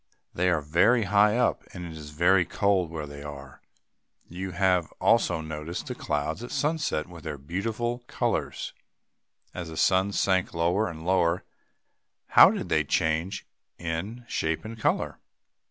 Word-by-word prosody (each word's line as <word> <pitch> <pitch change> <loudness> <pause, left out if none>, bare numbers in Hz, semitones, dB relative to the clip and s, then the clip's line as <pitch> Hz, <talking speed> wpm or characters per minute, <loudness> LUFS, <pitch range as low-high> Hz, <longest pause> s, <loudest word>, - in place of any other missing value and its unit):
They 90 +1 +1
are 85 -4 +2
very 95 +11 +3
high 105 +2 +4
up, 125 - +2
and 90 -1 -6
it 85 - -7
is 75 -2 -9
very 90 +5 +4
cold 95 -2 +1
where 80 -2 -5
they 70 0 -9
are. 70 -2 -9 0.7
You 95 +3 -5
have 90 -2 +1
also 90 -8 +3
noticed 80 +2 -5
the - - -4
clouds 75 +8 -2
at 120 - -6
sunset 145 - 0
with 85 -2 -12
their 75 -3 -5
beautiful 110 - -3
colors. - - -2 0.8
As 85 -2 -6
the 80 - -8
sun 95 +3 +3
sank 95 -3 +1
lower 90 +6 +1
and 80 -1 -9
lower, 90 -1 +2 0.9
how - - +9
did - - -3
they - - +3
change, 85 +5 0 0.3
in 90 +9 -4
shape 80 -2 -1
and 110 +1 -7
color? - - 0
90 Hz, 155 wpm, -27 LUFS, 80-100 Hz, 0.9 s, how